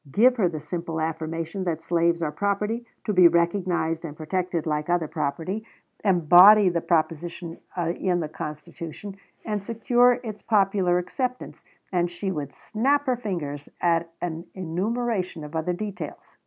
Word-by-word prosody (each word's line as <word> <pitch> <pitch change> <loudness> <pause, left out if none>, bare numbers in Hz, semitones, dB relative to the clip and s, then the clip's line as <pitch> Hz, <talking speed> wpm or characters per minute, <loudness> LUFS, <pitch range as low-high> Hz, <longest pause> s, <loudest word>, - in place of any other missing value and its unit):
Give 245 - +5
her 190 -6 +3
the 155 -2 -5
simple 165 +1 -4
affirmation 165 +3 -3
that 165 -2 -2
slaves 170 0 +1
are 150 - -1
property, 210 +5 -1 0.2
to 210 - -1
be 180 -2 +8
recognized 170 -1 +1
and 155 -2 -7
protected 175 +1 -2
like 150 0 -1
other 175 -2 +1
property, 170 +10 -3 0.4
embody 190 +2 +7
the 170 -1 -1
proposition 165 +1 -1 0.2
in 175 +1 0
the 160 - -2
Constitution, 160 +5 -7 0.3
and 210 -2 -2
secure 240 +3 +3
its 215 -3 -6
popular 195 -4 +2
acceptance, 250 +8 -4 0.3
and 175 -2 +1
she 180 +3 -3
would 145 -5 -4
snap 275 - 0
her 255 -2 +2
fingers 165 -11 -4
at 165 -1 +1
an 170 0 -4
enumeration 190 0 -2
of 150 +2 -8
other 160 +2 0
details. 205 +2 -7
175 Hz, 145 wpm, -25 LUFS, 165-205 Hz, 0.4 s, be